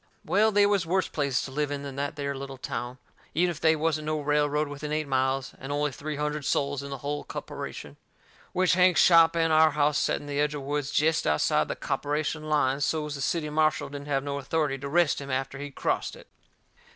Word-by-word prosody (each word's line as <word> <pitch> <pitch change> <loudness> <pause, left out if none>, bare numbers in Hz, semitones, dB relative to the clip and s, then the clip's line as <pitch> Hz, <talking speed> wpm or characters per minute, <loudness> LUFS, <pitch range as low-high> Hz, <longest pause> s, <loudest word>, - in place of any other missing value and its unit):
Well, 220 +2 +3
they 205 0 +5
was 200 -3 +2
worse 185 +2 0
places 140 -3 -1
to 135 - -7
live 145 +1 -1
in 145 -1 -4
than 140 -2 -7
that 145 +1 -2
there 140 -1 -3
little 135 0 -7
town, 125 -1 -5 0.4
even 175 +2 +3
if 165 - -8
they 160 0 +4
wasn't 155 -1 -1
no 155 0 0
railroad 150 +1 +1
within 145 +1 -6
eight 155 -1 -1
miles, 130 0 0
and 135 +2 -6
only 145 0 0
three 150 +3 -5
hundred 150 0 -2
soles 140 0 0
in 140 - -7
the 140 - -5
hull 145 +3 -4
copperation. - - -7 0.5
Which 185 -1 +2
Hank's 180 -3 +4
shop 165 -1 +6
and 165 -1 +2
our 155 0 +6
house 150 -1 +1
set - - +1
in - - -11
the 145 0 -3
edge 150 0 +1
of 145 - -5
the - - -9
woods 145 -1 -1
jest 155 +2 +2
outside 75 0 +2
the - - -3
copperation 155 +1 -2
line, 140 -2 +2
so's 150 0 -1
the 140 - -5
city 150 0 -1
marshal 155 -1 +1
didn't 145 0 -8
have 135 -2 0
no 140 0 -3
authority 140 -1 -1
to 140 - -5
arrest 165 0 +2
him 140 - -7
after 135 +1 -2
he 145 0 -5
crossed 140 - -2
it. - - -14
145 Hz, 225 wpm, -27 LUFS, 140-155 Hz, 0.5 s, shop